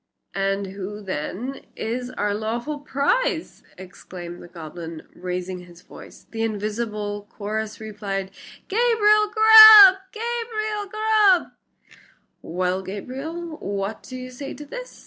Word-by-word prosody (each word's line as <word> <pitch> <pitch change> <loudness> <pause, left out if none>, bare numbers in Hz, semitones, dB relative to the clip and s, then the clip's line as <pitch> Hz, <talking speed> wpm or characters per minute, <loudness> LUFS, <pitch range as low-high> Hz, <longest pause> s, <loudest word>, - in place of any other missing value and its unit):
"And 195 0 -1
who, 195 +2 -7
then, 195 - -5
is 245 +3 -4
our 205 -4 -2
lawful 235 +8 -4
prize?" 320 - -1 0.2
exclaimed 180 -1 -10
the - - -12
goblin, 165 -1 -9
raising 180 0 -5
his 175 -1 -15
voice. - - -14
The 225 - -5
invisible 210 -1 -3
chorus 215 +1 -5
replied, 200 -3 -5 0.4
"Gabriel 425 -1 +3
Grubb! 435 -3 +10
Gabriel 440 -2 -3
Grubb!" 430 -3 +3 0.9
"Well, 180 +2 -2
Gabriel, 280 - -7
what 200 +2 -4
do 255 - -10
you 255 0 -8
say 275 +2 -8
to 295 - -10
this?" - - -9
220 Hz, 115 wpm, -23 LUFS, -, 0.9 s, Grubb